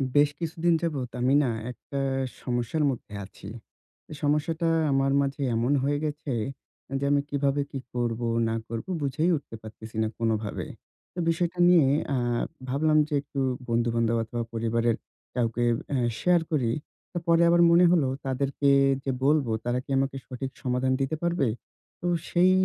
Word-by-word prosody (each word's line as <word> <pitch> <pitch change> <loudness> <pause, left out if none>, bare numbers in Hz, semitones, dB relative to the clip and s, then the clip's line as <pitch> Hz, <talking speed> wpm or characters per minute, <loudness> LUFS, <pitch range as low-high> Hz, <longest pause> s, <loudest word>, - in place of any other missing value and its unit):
বেশ 145 0 +6
কিছুদিন 170 0 +1
যাবৎ, 140 -7 -2
আমি 130 +2 +3
না? 125 - +1 0.2
একটা 140 +3 -6 0.4
সমস্যার 120 +5 -1
মধ্যে 120 -4 -8
আছি। 95 - -13 0.6
এ - - -5
সমস্যাটা 155 +3 +1 0.2
আমার 135 0 +2
মাঝে 140 0 -2
এমন 120 +4 +1
হয়ে 145 +1 +1
গেছে 150 -1 -4 0.7
যে, - - -4
আমি 145 0 +4
কিভাবে 140 0 +1
কি 135 - -4
করবো, 120 -1 -1 0.2
না 115 - -1
করবো 115 +8 -5
বুঝেই 150 +5 +1
উঠতে 140 -5 -10
পারতেছি 110 0 -11
না - - +1
কোনোভাবে। 110 -2 -1 0.5
তো 180 - -6
বিষয়টা 175 +1 -1
নিয়ে 170 -5 +6 0.3
আ - - +1 0.5
ভাবলাম 155 +3 +2
যে, 155 - -5
একটু 140 0 -6 0.3
বন্ধুবান্ধব 115 0 +1
অথবা 120 +1 -4
পরিবারের 115 0 +1 0.4
কাউকে 120 -1 0 0.3
অ্যা 140 - 0 0.2
শেয়ার 180 -1 +4
করি। 130 -7 +1 0.4
তো - - -5
পরে 170 0 +5
আবার 170 0 +5
মনে 175 +1 +6
হলো, 165 -6 +3 0.2
তাদেরকে 140 +1 0 0.3
যে, 135 - -1
বলবো, 145 -4 +3
তারা 120 +1 0
কি - - -26
আমাকে 135 0 0
সঠিক 130 +1 -5
সমাধান 125 +1 +1
দিতে 135 +3 0
পারবে? 170 -5 +1 0.5
তো 175 - -2 0.2
সেই 180 +1 +4
135 Hz, 155 wpm, -27 LUFS, 120-155 Hz, 0.7 s, বেশ